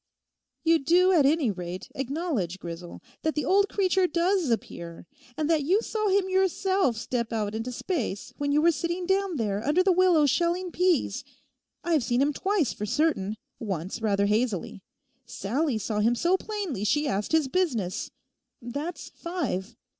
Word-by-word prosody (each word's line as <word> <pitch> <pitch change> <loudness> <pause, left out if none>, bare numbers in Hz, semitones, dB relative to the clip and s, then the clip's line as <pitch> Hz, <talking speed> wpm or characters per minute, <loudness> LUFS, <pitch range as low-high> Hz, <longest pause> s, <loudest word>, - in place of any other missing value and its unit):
'You 330 0 +4
do 355 +6 +4
at 305 -7 +5
any 290 -6 +2
rate 180 -1 -6
acknowledge, 270 - -2
Grisel, 170 -1 -8 0.2
that 315 - -1
the 300 -3 -1
old 400 +5 +3
creature 375 -2 +2
does 345 -1 +1
appear, 170 -8 -4 0.3
and 305 - 0
that 315 -3 +2
you 385 +10 +2
saw 430 -1 -1
him 385 0 +2
yourself 375 - +1
step 235 0 -2
out 215 -2 -1
into 225 +3 -3
space 245 - -3
when 285 0 0
you 300 +2 +3
were 340 - +6
sitting 340 +3 -2
down 385 -1 +1
there 210 -5 -1
under 300 +8 +3
the 380 - +4
willow 355 -4 +4
shelling 345 +5 +1
peas. 360 -1 +1 0.6
I've 325 -6 +2
seen 240 0 +1
him 285 +2 +2
twice 385 - 0
for 210 - -5
certain, 230 -6 0 0.2
once 190 -1 -4
rather 200 -2 +2
hazily; 210 -3 -1 0.5
Sallie 240 +4 -1
saw 215 0 -2
him 230 +3 +3
so 345 +9 +2
plainly 380 - -4
she 295 +7 +1
asked 205 -5 -2
his 320 -3 +3
business: 255 - -1 0.5
that's 285 +8 -5
five. 325 - -4
295 Hz, 160 wpm, -27 LUFS, 220-360 Hz, 0.6 s, were